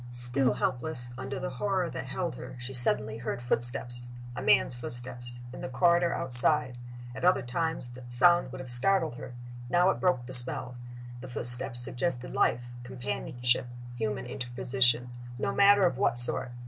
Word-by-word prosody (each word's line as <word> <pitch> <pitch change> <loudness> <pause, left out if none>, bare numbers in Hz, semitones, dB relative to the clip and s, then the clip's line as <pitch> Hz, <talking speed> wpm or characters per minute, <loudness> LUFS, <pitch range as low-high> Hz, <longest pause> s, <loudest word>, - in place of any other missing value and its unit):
Still 120 +2 +5
helpless, 125 -2 -5
under 130 +1 -7
the 135 0 -6
horror 185 +7 -3
that 130 -4 -8
held 175 +5 -5
her, 130 - -11
she 125 +2 -8
suddenly 110 -3 +1
heard 120 0 -6
footsteps 120 0 0 0.3
a - - -7
man's - - +1
footsteps 120 0 -5
in - - -10
the - - -7
corridor 170 +5 +1
outside. 125 0 +5 0.3
At - - -10
other 180 -4 +1
times 160 +1 -5
the 125 +1 -13
sound 175 +5 +2
would 135 +1 -9
have 130 -2 -2
startled 160 +5 -1
her: 120 - -11 0.3
now 180 +5 +2
it - - -7
broke 180 -10 -1
the 130 - -9
spell. 125 0 +3 0.5
The 130 - -11
footsteps 120 0 0
suggested 125 0 -5
life, 120 - 0 0.2
companionship, 125 0 0 0.3
human 110 -3 -5
interposition 125 0 -2 0.3
no - - -4
matter 200 -1 +3
of 150 -8 -2
what 120 - 0
sort. 120 +1 +8
125 Hz, 160 wpm, -27 LUFS, 120-135 Hz, 0.5 s, sort